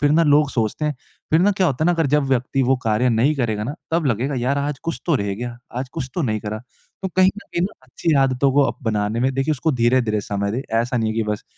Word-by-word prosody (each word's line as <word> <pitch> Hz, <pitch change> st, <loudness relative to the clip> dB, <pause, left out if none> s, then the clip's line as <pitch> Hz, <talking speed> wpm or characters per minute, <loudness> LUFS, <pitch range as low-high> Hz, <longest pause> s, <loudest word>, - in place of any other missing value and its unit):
फ़िर 145 Hz, -, +3 dB
ना 165 Hz, -, +4 dB
लोग 145 Hz, -1 st, +4 dB
सोचते 115 Hz, +5 st, -1 dB
हैं 150 Hz, -, 0 dB, 0.4 s
फ़िर 160 Hz, +2 st, +4 dB
ना 200 Hz, -, +4 dB
क्या 190 Hz, -1 st, +1 dB
होता 150 Hz, +1 st, 0 dB
है -, -, +3 dB
ना 175 Hz, -, +4 dB
अगर 165 Hz, -3 st, +1 dB
जब 150 Hz, 0 st, +2 dB
व्यक्ति 130 Hz, +1 st, +1 dB
वो 130 Hz, +1 st, +3 dB
कार्य 110 Hz, +3 st, +2 dB
नहीं 120 Hz, +7 st, +2 dB
करेगा 110 Hz, -5 st, -1 dB
ना, 140 Hz, +6 st, -4 dB, 0.2 s
तब 165 Hz, -3 st, +1 dB
लगेगा 130 Hz, +4 st, 0 dB
यार 130 Hz, +4 st, 0 dB
आज 140 Hz, 0 st, -2 dB
कुछ 165 Hz, -, -3 dB
तो 170 Hz, -, +3 dB
रह 100 Hz, -4 st, -2 dB
गया, 120 Hz, +2 st, -6 dB, 0.2 s
आज 130 Hz, +1 st, -3 dB
कुछ 130 Hz, -, -4 dB
तो 175 Hz, -, -1 dB
नहीं 110 Hz, -6 st, -1 dB
करा। 105 Hz, 0 st, -4 dB, 0.4 s
तो 190 Hz, -, -1 dB
कहीं 185 Hz, 0 st, +6 dB
न 210 Hz, -, -7 dB
कहीं 170 Hz, -, 0 dB
न -, -, +2 dB, 0.2 s
अच्छी 130 Hz, +5 st, -2 dB
आदतों 130 Hz, +1 st, +1 dB
को 145 Hz, +1 st, +5 dB
अब -, -, -2 dB
बनाने 105 Hz, +1 st, 0 dB
में 130 Hz, +2 st, +1 dB
देखिए, 135 Hz, +3 st, +1 dB
उसको 150 Hz, +3 st, 0 dB
धीरे-धीरे 120 Hz, -3 st, +2 dB
समय 100 Hz, 0 st, -2 dB
दें। 130 Hz, +4 st, -2 dB, 0.2 s
ऐसा 125 Hz, +1 st, -2 dB
नहीं 110 Hz, -1 st, 0 dB
है 110 Hz, -, -4 dB
कि 115 Hz, -, +2 dB
बस 105 Hz, -, -3 dB
130 Hz, 275 wpm, -21 LUFS, 115-150 Hz, 0.4 s, कहीं